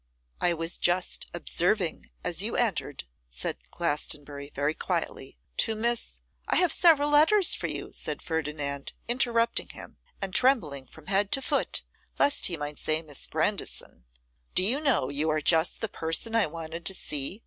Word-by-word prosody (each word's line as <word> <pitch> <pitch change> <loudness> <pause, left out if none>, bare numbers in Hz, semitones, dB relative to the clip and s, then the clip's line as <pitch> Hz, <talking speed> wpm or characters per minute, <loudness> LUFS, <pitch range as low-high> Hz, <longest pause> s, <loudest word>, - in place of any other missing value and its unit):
'I 175 -1 +2
was 165 +1 -1
just 180 +1 +1
observing 175 - 0
as - - +2
you - - 0
entered,' - - -1 0.3
said - - -3
Glastonbury, 145 -3 -3
very 145 +1 -1
quietly, - - -4 0.2
'to 225 - +1
Miss 235 +2 0 0.2
' - - -41
'I - - +2
have 360 -2 +3
several 295 -4 +4
letters 330 +6 +5
for - - -1
you,' - - -3
said - - -3
Ferdinand, 150 -3 -4
interrupting 235 -1 +1
him, - - -10 0.2
and 195 -2 -4
trembling 160 - +2
from 160 - -15
head 200 +1 +1
to 270 - +2
foot 285 - +1 0.3
lest 285 - +4
he 170 - -3
might 145 0 -5
say 155 +1 0
Miss 145 -3 -1
Grandison. - - -3 0.5
'Do 185 - +4
you 240 +9 +4
know 240 - +2
you 145 +3 0
are 155 0 +1
just 160 +2 +3
the 225 - -1
person 165 +4 -2
I 225 -5 +3
wanted 165 +1 -7
to 190 - +2
see? 150 +7 -1
170 Hz, 165 wpm, -27 LUFS, 150-230 Hz, 0.5 s, letters